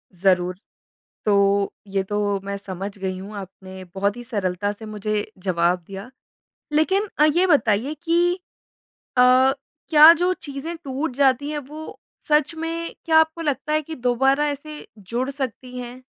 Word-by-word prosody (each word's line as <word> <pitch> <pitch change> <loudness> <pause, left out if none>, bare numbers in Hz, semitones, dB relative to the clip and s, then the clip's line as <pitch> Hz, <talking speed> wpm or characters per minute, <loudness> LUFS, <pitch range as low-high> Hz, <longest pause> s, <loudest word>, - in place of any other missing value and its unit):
ज़रूर। 180 -1 +2 0.7
तो 200 -1 +3 0.2
ये 195 0 0
तो 205 0 -1
मैं 200 0 -3
समझ 195 +1 -6
गई 190 -1 -3
हूँ 200 +3 -9
आपने 190 -1 -9
बहुत 200 +2 0
ही 240 - -8
सरलता 205 -4 -2
से 215 +1 -11
मुझे 215 0 -3
जवाब 180 -1 +1
दिया। 195 +5 -8 0.6
लेकिन 380 +7 +2
अ, 300 - +6
ये 345 +5 +3
बताइए 275 - +2
कि 345 +1 +2 0.8
अ, - - +7 0.7
क्या 310 0 +10
जो 355 +2 +1
चीज़ें 285 +4 -6
टूट 270 0 -3
जाती 275 +1 +2
हैं 300 - -2
वो 300 +3 -9 0.3
सच 300 +1 +3
में, 330 +1 -4
क्या 320 -1 +4
आपको 320 +1 +1
लगता 300 0 -1
है 310 - +2
कि 320 +2 -8
दोबारा 270 +3 +2
ऐसे 300 +1 -7
जुड़ 240 +7 -3
सकती 255 -2 -5
हैं? 250 +1 -8
250 Hz, 150 wpm, -23 LUFS, 200-305 Hz, 0.8 s, क्या